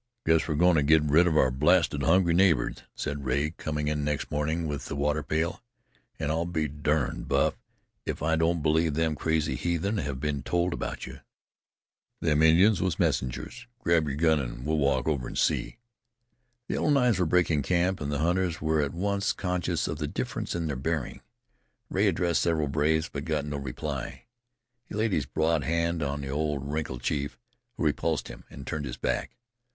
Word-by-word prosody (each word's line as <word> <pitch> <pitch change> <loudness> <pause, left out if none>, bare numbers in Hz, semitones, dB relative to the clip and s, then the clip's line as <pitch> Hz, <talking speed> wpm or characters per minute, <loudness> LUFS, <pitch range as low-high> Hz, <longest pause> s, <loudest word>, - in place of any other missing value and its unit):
"Guess 80 0 +3
we're 80 - -1
goin' 90 +3 +4
to - - +4
get 75 +2 +4
rid 75 +4 +4
of 80 -3 +2
our 65 - +4
blasted 75 +2 +3
hungry 85 +3 +3
neighbors," 90 -2 +3
said 75 -1 -4
Rea, 70 +4 0
coming 75 -2 -3
in 75 -1 -1
next 75 0 -2
morning 80 +3 -1
with 75 -2 -4
the - - -4
water 75 +2 0
pail, 80 +7 -1 0.6
"An' 75 -1 -1
I'll 85 +2 0
be 80 -3 -1
durned, 75 -1 -1
Buff, - - +2 0.5
if - - -4
I 80 +1 +2
don't 80 0 +1
believe 80 0 +2
them 80 0 +1
crazy 80 0 0
heathen 90 +5 -1
have 70 -5 -3
been 70 0 -2
told 85 +3 0
about - - -4
you. - - -9 1.0
Them 75 -2 +2
Indians 85 +5 +5
was 90 -3 0
messengers. 65 - -2
Grab 85 -7 +2
your 70 - -2
gun, 80 -1 +3
an' 60 -3 -4
let's - - -3
walk 70 -4 +1
over 70 -6 0
and - - -6
see." - - 0 0.9
The - - -2
Yellow - - 0
Knives 125 -8 +3
were 90 - +2
breaking 85 -3 +2
camp, 90 +5 +1
and 70 0 -2
the 70 - 0
hunters 85 +2 0
were 80 0 +1
at 70 +2 -2
once 100 +3 0
conscious 90 -2 -1
of - - -4
the - - -2
difference - - -3
in 85 -1 -2
their 75 -3 -2
bearing. 75 +1 -3 0.7
Rea - - +2
addressed 85 -2 +1
several 80 -4 +1
braves, 80 +2 +1
but 70 - -6
got 75 -2 -1
no 75 -1 -3
reply. 70 0 -5 0.6
He - - -9
laid 110 +1 +1
his 75 -8 0
broad 80 -1 +1
hand 85 +1 0
on 70 0 -2
the 70 - -5
old 75 -1 -1
wrinkled 70 -5 -3
chief, 70 0 -2 0.4
who - - -2
repulsed 75 -2 0
him, - - -11
and 70 - -10
turned 75 -1 -3
his 65 - -6
back. - - -2
80 Hz, 190 wpm, -28 LUFS, 75-85 Hz, 1.0 s, Indians